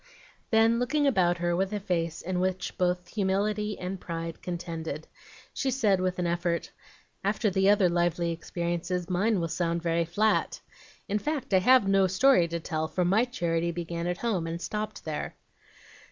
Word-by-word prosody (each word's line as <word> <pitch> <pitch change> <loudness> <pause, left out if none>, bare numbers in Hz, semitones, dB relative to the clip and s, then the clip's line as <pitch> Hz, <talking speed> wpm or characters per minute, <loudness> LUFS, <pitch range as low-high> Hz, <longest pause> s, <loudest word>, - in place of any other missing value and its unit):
Then, 225 +1 +4
looking 290 +4 +1
about 180 -10 +3
her 175 0 0
with 190 +2 0
a 210 - -2
face 170 -5 -2
in 180 0 -2
which 185 0 -2
both 180 0 0
humility 210 +1 0
and 185 +1 -5
pride 165 -1 -5
contended, 165 -3 -5 0.5
she 270 - -1
said 215 -8 +2
with 185 0 -1
an 180 - -1
effort, 170 0 -1 0.5
"After 210 +1 +1
the 190 +1 +3
other 205 -2 +5
lively 175 0 +1
experiences, 175 +1 -3
mine 200 +3 +2
will 165 - -1
sound 170 0 -1
very 170 0 +1
flat. 210 +6 +1 0.5
In 210 +1 0
fact, 280 -4 -3
I 190 - +6
have 250 +1 +5
no 195 -1 +4
story 190 -1 +4
to 170 0 -3
tell, 160 -1 -2
for 180 +2 -1
MY 205 +7 +3
charity 170 -8 -1
began 170 0 -4
at 175 0 -1
home, 190 -8 -1
and 165 +1 -4
stopped 210 +4 -4
there." 155 -2 -4
180 Hz, 170 wpm, -28 LUFS, 170-210 Hz, 0.5 s, I